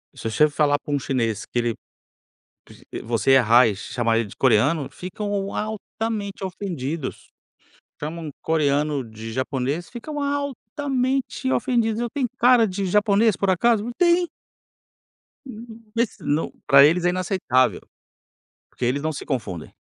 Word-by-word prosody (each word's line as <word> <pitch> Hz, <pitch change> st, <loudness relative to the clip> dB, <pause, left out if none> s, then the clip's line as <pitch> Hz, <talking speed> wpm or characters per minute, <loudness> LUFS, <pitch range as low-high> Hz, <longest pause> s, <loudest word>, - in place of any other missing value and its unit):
se 115 Hz, -, -4 dB
você 150 Hz, +7 st, +3 dB
falar 145 Hz, 0 st, +2 dB
para 145 Hz, -, -5 dB
um 145 Hz, -, +1 dB
chinês 115 Hz, -6 st, -1 dB
que 120 Hz, -, -2 dB
ele 120 Hz, -1 st, 0 dB, 1.0 s
vo -, -, -13 dB, 0.3 s
você 120 Hz, +3 st, +2 dB
errar 120 Hz, -2 st, +6 dB
e 105 Hz, -, -2 dB
chamar 115 Hz, +2 st, 0 dB
ele 115 Hz, -3 st, -2 dB
de -, -, -13 dB
coreano, 135 Hz, +5 st, +3 dB
ficam 185 Hz, +4 st, -6 dB, 0.3 s
altamente 215 Hz, -1 st, -4 dB
ofendidos. 165 Hz, -6 st, -5 dB, 0.7 s
Chamam 155 Hz, +1 st, -5 dB
coreano 150 Hz, -3 st, +1 dB
de 110 Hz, 0 st, -9 dB
japonês, 135 Hz, +6 st, -2 dB
ficam 290 Hz, +5 st, -5 dB
altamente 275 Hz, -1 st, -2 dB
ofendidos. 235 Hz, -4 st, +1 dB
"Eu 240 Hz, -, -1 dB
tenho 265 Hz, -3 st, -1 dB
cara 245 Hz, -2 st, +5 dB
de 195 Hz, 0 st, -3 dB
japonês 210 Hz, +2 st, +3 dB
por 195 Hz, -, +1 dB
acaso?" 215 Hz, +3 st, +2 dB
Eu: 240 Hz, -, -3 dB
"Tem". 350 Hz, -1 st, +3 dB, 1.2 s
Hum, 230 Hz, -2 st, -11 dB
mas 230 Hz, -1 st, +1 dB
se -, -, -17 dB
não 150 Hz, +3 st, 0 dB, 0.2 s
para 140 Hz, 0 st, +8 dB
eles 170 Hz, +4 st, +2 dB
é 175 Hz, -, +4 dB
inaceitável. 170 Hz, -, +1 dB, 0.9 s
Porque 125 Hz, -, -4 dB
eles 130 Hz, +4 st, 0 dB
não 155 Hz, -, -1 dB
se 150 Hz, -, -7 dB
confundem. 105 Hz, -, -4 dB
170 Hz, 145 wpm, -23 LUFS, -, 1.2 s, para